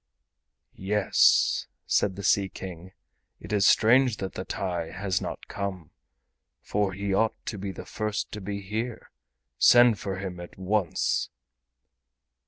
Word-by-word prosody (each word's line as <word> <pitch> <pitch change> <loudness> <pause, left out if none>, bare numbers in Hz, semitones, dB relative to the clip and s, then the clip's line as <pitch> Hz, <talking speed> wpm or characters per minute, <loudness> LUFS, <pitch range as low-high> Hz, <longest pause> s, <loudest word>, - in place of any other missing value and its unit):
"Yes," 100 +1 +3 0.2
said 95 -2 +1
the 100 - -7
Sea 100 -1 +3
King, 95 -1 -9 0.5
"it - - -7
is 100 -2 +4
strange 120 0 +4
that 95 -1 -5
the 95 - -5
TAI 85 -4 -3
has 95 0 -2
not - - -6
come, 95 -6 -5 0.7
for 100 -2 -1
he 100 +1 -2
ought 110 +3 +2
to 105 - -5
be 100 0 -4
the - - -9
first 105 -1 -3
to 105 - -6
be 100 +1 -4
here. 110 +4 -5 0.5
Send 120 -3 +6
for 95 -1 -4
him 95 -2 -6
at 85 - -10
once!" 95 -1 0
100 Hz, 140 wpm, -27 LUFS, 95-105 Hz, 0.7 s, Send